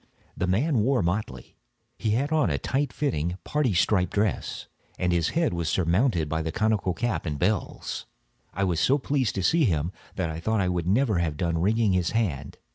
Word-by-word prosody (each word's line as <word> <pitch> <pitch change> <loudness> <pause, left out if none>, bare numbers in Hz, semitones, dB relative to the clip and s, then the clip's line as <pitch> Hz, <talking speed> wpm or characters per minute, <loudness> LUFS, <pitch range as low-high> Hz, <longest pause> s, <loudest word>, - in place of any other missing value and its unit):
The 90 - -1
man 120 - +2
wore 125 0 +2
motley. 85 - -3 0.4
He 110 - -2
had 140 +4 -1
on 155 - +3
a 70 - 0
tight 135 - -1
fitting 90 - -1
parti 145 -9 0
striped 90 0 +2
dress, 105 -1 -1 0.3
and 90 -1 0
his 85 -2 +1
head 165 - +2
was 85 -2 -1
surmounted 90 - +1
by 80 +2 -1
the 80 0 -3
conical 105 -3 0
cap 110 -8 -2
and 75 -2 -2
bells. 95 +4 -2 0.4
I 100 - -2
was 90 -4 +1
so 135 - +3
pleased 135 -4 -1
to 95 - -1
see 160 - +3
him, 80 -4 0 0.2
that 85 -4 -1
I 80 - -5
thought 110 +6 0
I 95 -2 +1
should 85 -1 -2
never 105 -1 +2
have 80 -3 -1
done 85 0 0
wringing 105 +1 +2
his 90 -2 0
hand. 75 -11 -2
95 Hz, 200 wpm, -26 LUFS, 85-115 Hz, 0.4 s, on